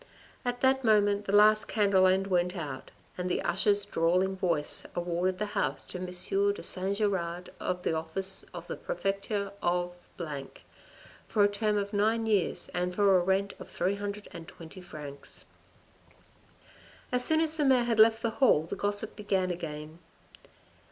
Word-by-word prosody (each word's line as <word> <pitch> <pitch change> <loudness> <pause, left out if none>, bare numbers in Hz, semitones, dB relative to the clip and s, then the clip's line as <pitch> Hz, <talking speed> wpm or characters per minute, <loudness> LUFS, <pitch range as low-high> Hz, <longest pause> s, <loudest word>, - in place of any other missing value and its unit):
At 245 0 -3
that 265 0 +3
moment 205 -2 +3
the - - -2
last 215 +1 +5
candle 200 -3 +3
end 190 +1 +2
went 180 -1 0
out 140 -5 -6 0.3
and 180 0 -2
the - - -1
usher's 200 +3 +1
drawling 185 +1 +1
voice 170 -6 0
awarded 175 +1 -1
the 210 - -1
house - - -1
to 180 - -8
M. 185 - -4
de 195 +3 0
St. 195 +2 0
Giraud 180 -4 -2
of 180 0 -3
the - - 0
office 185 +4 -1
of 175 -1 -8
the - - -6
prefecture 195 +2 -2
of 175 0 0 1.3
for 210 - +2
a - - +6
term 210 +1 0
of 200 +1 -3
nine 220 +3 +1
years 205 -5 +1
and 180 0 -2
for 200 -1 +4
a 180 - +4
rent 195 +2 0
of - - -10
320 190 -3 -5
francs. 145 -5 -11 1.7
As 250 0 +3
soon 315 +5 +4
as 320 -1 +1
the 305 - 0
mayor 260 -3 +4
had 230 -2 0
left 225 +1 +6
the 230 - +1
hall, 195 - +5
the 165 - -5
gossip 205 +1 -2
began 190 -3 0
again. 155 -2 -6
195 Hz, 160 wpm, -29 LUFS, 175-210 Hz, 1.7 s, a